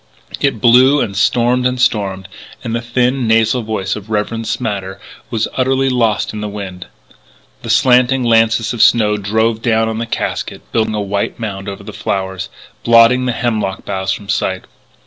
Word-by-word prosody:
It 135 -6 0
blew 125 +4 +5
and 100 -6 -2
stormed 125 +4 +2
and 125 0 -3
stormed, 100 -6 0 0.4
and 115 - -4
the 115 - -2
thin, 125 +1 0
nasal 115 +2 +2
voice 105 -3 -3
of 105 0 -9
"Rev. 110 +1 -2
Smatter" 100 -2 -3 0.3
was 115 -2 -1
utterly 135 +1 +1
lost 115 -4 0
in 105 - -5
the 105 - -4
wind. 95 -3 -7 0.7
The 115 - -8
slanting 125 +2 +3
lances 115 0 +2
of 120 - -2
snow 105 -3 +4
drove 110 +2 0
down 115 -2 +1
on 110 0 -3
the 115 - -3
casket, - - -4
building 110 -1 0
a 105 - -1
white 100 0 -2
mound 100 -3 -5
over 100 - -8
the - - -9
flowers, 95 -1 -3 0.3
blotting 115 +2 +5
the - - +1
hemlock 110 -5 -2
boughs 95 -1 -2
from 100 +1 -5
sight. 95 -2 -1
110 Hz, 170 wpm, -16 LUFS, 100-120 Hz, 0.7 s, blew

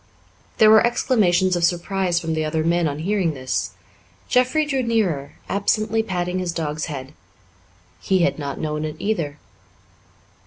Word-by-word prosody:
There 215 -1 +7
were 220 - +7
exclamations 195 -7 +2
of 175 - -1
surprise 175 +1 +1
from 165 -2 -3
the 155 0 -1
other 155 +1 -1
men 170 0 +2
on 145 -1 -3
hearing 175 -1 0
this. 130 -1 -2 0.6
Jeffrey 255 +5 +2
drew 275 -3 0
nearer, 200 - 0
absently 215 +2 +1
patting 180 -3 -2
his 180 -2 -2
dog's 155 -1 -3
head. 140 -3 -7 0.9
He 190 -2 +1
had - - 0
not 140 -2 -4
known 150 -1 -2
it 155 -1 -4
either. 165 -9 -2
175 Hz, 150 wpm, -22 LUFS, 155-210 Hz, 0.9 s, There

